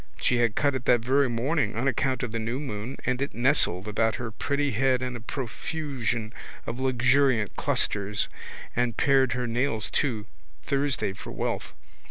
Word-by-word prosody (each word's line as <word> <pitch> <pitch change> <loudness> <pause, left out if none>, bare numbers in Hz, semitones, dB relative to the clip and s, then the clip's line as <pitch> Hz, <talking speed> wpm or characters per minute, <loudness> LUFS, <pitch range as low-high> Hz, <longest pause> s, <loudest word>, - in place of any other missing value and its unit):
She 125 - +2
had 120 -3 +2
cut 145 -1 +2
it 130 -1 -3
that 120 -2 +5
very 135 +3 +3
morning 120 0 0
on 125 +4 +1
account 130 0 +1
of 120 - -2
the 115 - -2
new 115 +4 -2
moon 125 -2 -5
and 130 0 0
it 140 - -2
nestled 120 - +2
about 110 +2 +1
her 120 -2 -4
pretty 140 +5 0
head 130 +2 +2
in 125 -1 -3
a - - -5
profusion 120 -2 -3 0.3
of 120 - -4
luxuriant 130 -3 +3
clusters 100 0 0 0.5
and 120 -2 0
pared 135 -3 +4
her 125 0 -1
nails 115 -2 0
too, 115 -8 0 0.4
Thursday 140 -7 0
for - - -9
wealth. - - -3
125 Hz, 170 wpm, -27 LUFS, 115-135 Hz, 0.5 s, that